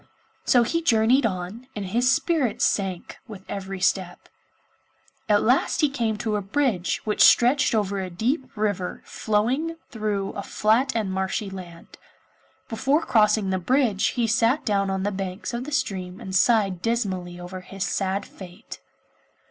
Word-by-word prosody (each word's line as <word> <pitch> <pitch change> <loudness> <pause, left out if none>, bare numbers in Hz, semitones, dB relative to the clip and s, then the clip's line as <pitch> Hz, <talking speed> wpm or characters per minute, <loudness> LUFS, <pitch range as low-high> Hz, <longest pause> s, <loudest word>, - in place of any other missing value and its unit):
So 245 -2 +5
he 330 +9 -1
journeyed 240 -2 +3
on, 190 +5 -6
and 205 -2 -4
his 240 +7 +2
spirits 275 - +1
sank 190 -3 -2
with 200 -4 -10
every 195 -1 -5
step. 180 -1 -1 1.0
At 205 -1 +4
last 250 +4 +2
he 300 - +4
came 230 -6 -1
to 215 -1 -1
a - - -2
bridge 200 -4 0
which 210 -1 0
stretched 250 +1 +5
over 200 -2 0
a 185 - -4
deep 250 - -2
river 205 -4 -2
flowing 250 +10 -1 0.2
through 210 -3 -2
a 200 - -5
flat 225 +7 +1
and 215 -4 -1
marshy 190 +2 -2
land. 175 -3 -11 0.7
Before 275 +8 +1
crossing 210 -3 +2
the 185 - 0
bridge 230 0 +1
he 240 - +2
sat 230 +5 +2
down 200 -2 +1
on 190 0 -2
the 205 - 0
banks 190 +3 -5
of 240 +2 -3
the 300 - -7
stream 190 -9 -2
and 190 0 -6
sighed 195 -4 +3
dismally 185 -6 -2
over 180 +1 -7
his 190 +1 -6
sad 195 +1 -1
fate. 180 -2 -11
210 Hz, 155 wpm, -24 LUFS, 190-240 Hz, 1.0 s, So